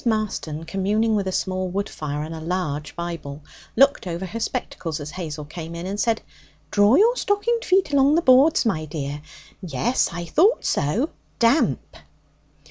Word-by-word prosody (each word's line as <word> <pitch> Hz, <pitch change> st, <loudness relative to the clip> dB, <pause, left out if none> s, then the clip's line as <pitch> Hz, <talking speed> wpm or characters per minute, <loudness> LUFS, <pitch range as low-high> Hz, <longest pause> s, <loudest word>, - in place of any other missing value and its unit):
Marston, 215 Hz, -9 st, -2 dB
communing 205 Hz, +6 st, 0 dB
with 200 Hz, -2 st, -1 dB
a -, -, -1 dB
small 185 Hz, 0 st, -1 dB
wood 200 Hz, +3 st, -2 dB
fire 150 Hz, -1 st, -4 dB
and 160 Hz, +1 st, -6 dB
a 160 Hz, -, -6 dB
large 155 Hz, -4 st, -3 dB
Bible, 165 Hz, -4 st, -6 dB, 0.3 s
looked 275 Hz, -5 st, +4 dB
over 175 Hz, +2 st, -3 dB
her 215 Hz, +5 st, -5 dB
spectacles 180 Hz, -10 st, -3 dB
as 150 Hz, +1 st, -6 dB
Hazel 155 Hz, -4 st, -6 dB
came 165 Hz, +2 st, -8 dB
in, 170 Hz, +1 st, -6 dB
and 200 Hz, +2 st, -4 dB
said: 225 Hz, 0 st, +1 dB, 0.5 s
'Draw 205 Hz, +4 st, +5 dB
your 455 Hz, -, +5 dB
stockinged 460 Hz, +2 st, 0 dB
foot 370 Hz, -7 st, +2 dB
along 280 Hz, +2 st, +5 dB
the 335 Hz, -, +3 dB
boards, 265 Hz, +3 st, +5 dB
my 165 Hz, -8 st, 0 dB
dear. 145 Hz, -1 st, -5 dB, 0.4 s
Yes, 185 Hz, -, 0 dB
I 175 Hz, +1 st, -5 dB
thought 385 Hz, -, +3 dB
so, 210 Hz, -, 0 dB, 0.3 s
damp.' 235 Hz, +6 st, +1 dB
190 Hz, 165 wpm, -23 LUFS, 160-250 Hz, 0.5 s, Draw